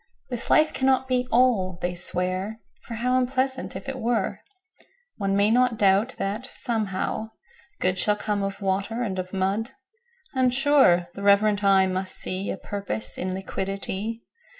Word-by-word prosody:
7This 245 0 -2
life 310 0 +4
cannot 265 0 +2
be 250 -1 0
All, 225 -7 +3
they 175 0 -2
swear,8For 185 +6 -3
how 250 +3 +1
unpleasant, 260 +1 -1
if - - -7
it 270 -1 -4
were!9One 370 - -4
may 200 +2 +3
not 250 -1 +3
doubt 205 +5 +3
that, 210 +6 -3
somehow, 220 -3 -2 0.5
Good10Shall 185 +3 +1
come 210 -1 -1
of 195 +1 -4
Water 200 +5 -1
and 190 -5 -3
of 185 0 -5
Mud;11And, 260 - -3
sure, 265 -11 +4
the 200 - -8
reverent 205 +1 +4
eye 195 -1 +5
must 185 0 -1
see12A 190 +1 -3
Purpose 205 +2 -4
in 185 +1 -2
Liquidity. 195 +3 -4
215 Hz, 135 wpm, -25 LUFS, 195-255 Hz, 0.5 s, eye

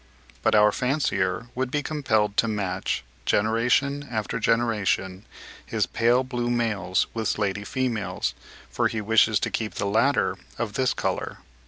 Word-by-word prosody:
But - - +3
our 105 0 +6
fancier 115 -6 0
would 130 0 -2
be 145 +2 -1
compelled 110 -10 0
to 115 - +4
match, 95 -4 -2 0.2
generation 125 +6 +1
after 110 -1 -2
generation, 105 -5 0 0.4
his - - 0
pale 120 +2 +2
blue 120 -2 -2
males 110 -6 +1
with 110 -2 -2
slaty 100 -1 -1
females, 120 -3 -2 0.4
for - - +1
he 115 - -3
wishes 110 -1 +3
to - - -1
keep 110 -5 -3
the 100 - -2
latter 115 +8 +2 0.2
of - - -3
this - - +1
colour. - - -2
115 Hz, 145 wpm, -25 LUFS, 105-125 Hz, 0.4 s, our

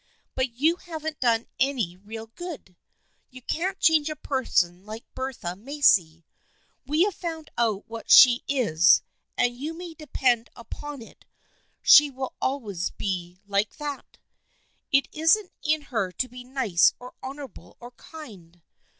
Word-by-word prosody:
But 260 -2 -1
you 310 +8 +2
haven't 315 -3 -6
done 230 -2 +2
any 245 -10 0
real 220 +4 -9
good. 250 - -9 0.5
You 255 -1 -13
can't 375 +8 -2
change 315 -2 +4
a 305 - -4
person 190 -12 0
like 215 +2 -9
Bertha 260 -10 -5
Macy. 195 - +2 0.6
We 305 +5 +3
have 405 0 0
found 325 -3 -6
out 220 -4 0
what 230 0 -9
she 245 -1 +8
is 210 - +4 0.3
and 245 0 +1
you 300 +6 -5
may 345 -1 -8
depend 255 -6 0
upon 285 +2 -8
it - - -18 0.6
she 295 -1 +8
will 260 -1 -6
always 210 -10 -2
be 180 -2 -5
like 200 +1 -1
that. 290 -2 -7 0.7
It 275 0 +3
isn't 330 +6 +2
in 310 0 0
her 225 -9 -2
to 255 - -2
be 250 0 -11
nice 245 -9 +2
or 250 0 -11
honorable 270 -2 -9
or 240 0 -11
kind. 210 - -13
255 Hz, 140 wpm, -25 LUFS, 210-295 Hz, 0.7 s, she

